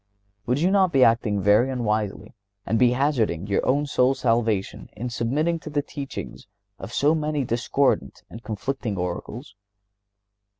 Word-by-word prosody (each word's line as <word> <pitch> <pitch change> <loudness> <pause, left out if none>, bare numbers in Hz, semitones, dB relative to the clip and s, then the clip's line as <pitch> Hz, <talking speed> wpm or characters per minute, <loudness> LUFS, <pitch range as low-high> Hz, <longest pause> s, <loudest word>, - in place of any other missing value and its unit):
Would 125 +3 +1
you 180 +4 +2
not 190 -3 +3
be 135 -4 +4
acting 115 -3 +2
very 105 +6 +4
unwisely 110 -4 -2 0.3
and 115 - 0
be 125 -1 +4
hazarding 125 - 0
your 130 +8 +1
soul's 135 -2 +1
salvation 115 -4 0
in 120 +3 -5
submitting 145 +9 0
to 155 - -9
the 145 -1 -1
teachings 135 - -7 0.3
of 95 - -8
so 145 +5 +2
many 150 -2 -1
discordant 120 - 0
and 115 - -11
conflicting 110 -1 -4
oracles. 95 +8 -5
120 Hz, 140 wpm, -24 LUFS, 105-140 Hz, 0.3 s, be